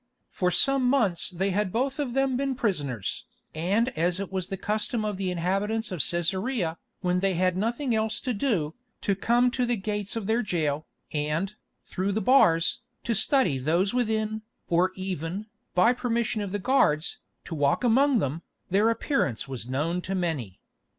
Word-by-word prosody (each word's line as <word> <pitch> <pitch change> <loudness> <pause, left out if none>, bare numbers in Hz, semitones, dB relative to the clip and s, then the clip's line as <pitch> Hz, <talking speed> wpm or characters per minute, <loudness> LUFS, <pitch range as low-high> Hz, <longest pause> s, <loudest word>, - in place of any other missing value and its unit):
For 180 - 0
some 275 +7 +3
months 210 -11 +2
they 190 +2 -1
had 200 0 0
both 265 +6 -1
of 270 -5 -2
them 270 -1 +2
been 270 0 -1
prisoners, 145 - -2 0.3
and 195 +10 +1
as 175 -4 0
it 200 -1 -4
was 185 -2 -2
the 195 - -4
custom 215 +3 -1
of 210 -1 -1
the 190 -1 -2
inhabitants 195 +5 -1
of 180 - -4
Cæsarea, 175 - 0 0.2
when 180 -1 +1
they 195 -1 +1
had 185 +1 +2
nothing 235 +6 -1
else 220 0 0
to 255 - -1
do, 200 - 0 0.3
to 200 - +1
come 240 +5 +2
to 250 0 0
the 240 -1 +1
gates 205 +1 -3
of 225 -3 -3
their 225 +3 +2
jail, 155 -7 -1 0.3
and, 155 +6 -1 0.3
through 195 +2 -2
the 215 - +1
bars, 215 -11 +4 0.2
to 235 - 0
study 215 - +4
those 170 - +1
within, 220 -3 0 0.3
or 175 +2 +3
even, 185 +1 -4 0.3
by 205 +7 +5
permission 235 -3 -1
of 200 -2 -4
the 205 - -1
guards, 185 - +2 0.3
to - - -6
walk 145 - +1
among 260 +3 +4
them, 155 - -1 0.3
their 205 +4 +4
appearance 225 - 0
was 125 -3 -6
known 160 +7 -1
to 195 +2 -3
many. 150 - -2
195 Hz, 175 wpm, -27 LUFS, 170-230 Hz, 0.3 s, by